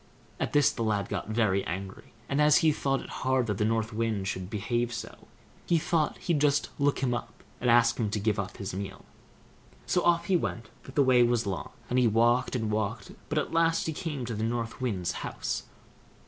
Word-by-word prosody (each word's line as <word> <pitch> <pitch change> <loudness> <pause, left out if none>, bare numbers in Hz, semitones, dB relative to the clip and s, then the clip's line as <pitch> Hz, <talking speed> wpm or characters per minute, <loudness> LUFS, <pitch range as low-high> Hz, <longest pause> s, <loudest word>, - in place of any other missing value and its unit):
At - - -2
this 145 -1 +5
the - - -6
lad 105 -3 0
got - - -3
very 110 -4 +2
angry; 95 +2 -6 0.2
and 140 +2 +1
as 150 0 +6
he 155 - +6
thought 135 -2 0
it - - -11
hard 130 -1 +2
that 105 -3 -2
the 105 - +2
North 110 0 0
Wind 110 -3 -1
should 95 -2 -4
behave 120 +3 -1
so, 120 - -7 0.4
he 170 - +4
thought 155 -1 0
he'd 165 -5 0
just 145 -1 +2
look 140 -1 +1
him 125 -2 +2
up, 120 -2 -6 0.2
and 125 - 0
ask 120 0 +4
him 110 -3 +1
to 105 +1 -1
give 105 0 0
up 95 -1 -4
his 100 -1 -5
meal. 95 0 -6 0.8
So 180 - +1
off 170 -1 +3
he 190 - +2
went, 120 -9 -2
but 130 - -13
the 145 - +5
way 130 -2 +5
was 120 -1 +3
long, 95 -3 -3 0.2
and 125 - +1
he 125 - +4
walked 120 +4 +3
and 110 -3 -1
walked; 105 -2 -2 0.2
but - - -1
at - - -1
last 165 0 +2
he 160 - -2
came 150 -6 -4
to 120 - -4
the 110 - -4
North 115 +1 -2
Wind's 100 -9 -1
house. - - -3
120 Hz, 220 wpm, -28 LUFS, 105-135 Hz, 0.8 s, as